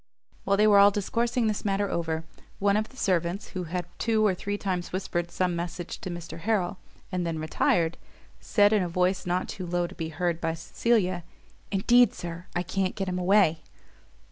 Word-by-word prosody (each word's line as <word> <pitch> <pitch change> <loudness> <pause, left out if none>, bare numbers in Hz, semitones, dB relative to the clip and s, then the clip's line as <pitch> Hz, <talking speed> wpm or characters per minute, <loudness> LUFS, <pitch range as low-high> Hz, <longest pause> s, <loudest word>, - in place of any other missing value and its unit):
While 200 0 +2
they 210 - +5
were 205 -2 +7
all 200 0 +8
discoursing 230 +4 0
this 215 -2 -1
matter 200 0 0
over, 165 -3 -2 0.3
one 200 0 +2
of 215 +1 0
the 260 - -18
servants, 180 0 0
who 185 -1 -4
had 175 +1 -3
two 220 -2 +2
or 200 - +4
three 205 +3 -3
times 185 -3 -3
whispered 175 -2 -2
some 180 0 0
message 170 0 -5
to - - -5
Mr 170 -1 -7
Harrel, 195 -1 0 0.3
and 180 -1 -1
then 165 -1 -2
retired, 160 +1 +1 0.4
said, 205 -1 +3
in 210 - +3
a 180 - -1
voice 180 +2 0
not 180 +1 0
too 185 -2 -6
low 175 0 0
to 175 - -8
be 165 -3 -4
heard 170 +1 -1
by 165 0 -1
Cecilia, 185 -1 0 0.5
"Indeed, 240 +5 +4
Sir, 170 +1 -7
I 175 - +1
can't 190 +1 -1
get 195 - -3
him 180 0 -2
away." 180 -4 +3
185 Hz, 195 wpm, -27 LUFS, 175-205 Hz, 0.5 s, all